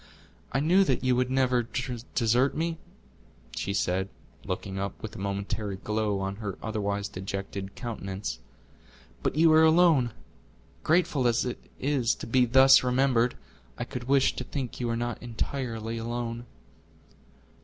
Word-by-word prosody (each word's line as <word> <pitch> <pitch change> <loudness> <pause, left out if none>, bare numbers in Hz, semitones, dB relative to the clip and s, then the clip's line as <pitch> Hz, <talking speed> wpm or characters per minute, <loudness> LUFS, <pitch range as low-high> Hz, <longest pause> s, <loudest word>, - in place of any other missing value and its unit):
"I 135 - +1
knew 175 +7 +4
that - - 0
you 130 -1 +3
would 125 0 +1
never 130 -2 +2 0.5
desert 125 +3 +3
me," 165 0 -1 0.8
she 100 - -2
said, 95 0 0 0.3
looking 95 +1 -4
up 100 0 -4
with 110 - -6
a - - -7
momentary 100 +1 -3
glow 105 0 -1
on 95 +1 -3
her 105 -4 -5
otherwise 100 -2 -2
dejected 95 0 -5
countenance. 95 - -5 0.8
"But - - -1
you 160 +1 +5
are 160 - +7
alone! 160 -6 +5 0.7
Grateful 155 -6 +2
as 120 +1 +2
it 125 - -4 0.2
is 130 -3 +1
to - - -8
be 125 +2 +3
thus 135 +2 +7
remembered, 125 -1 +2 0.4
I - - -2
could 125 -1 -6
wish 135 +1 +3
to - - -2
think 130 -1 -5
you 120 -1 -1
are 115 - 0
not 120 -1 -3
entirely 115 -1 -3
alone." 120 +1 -4
120 Hz, 145 wpm, -28 LUFS, 100-130 Hz, 0.8 s, are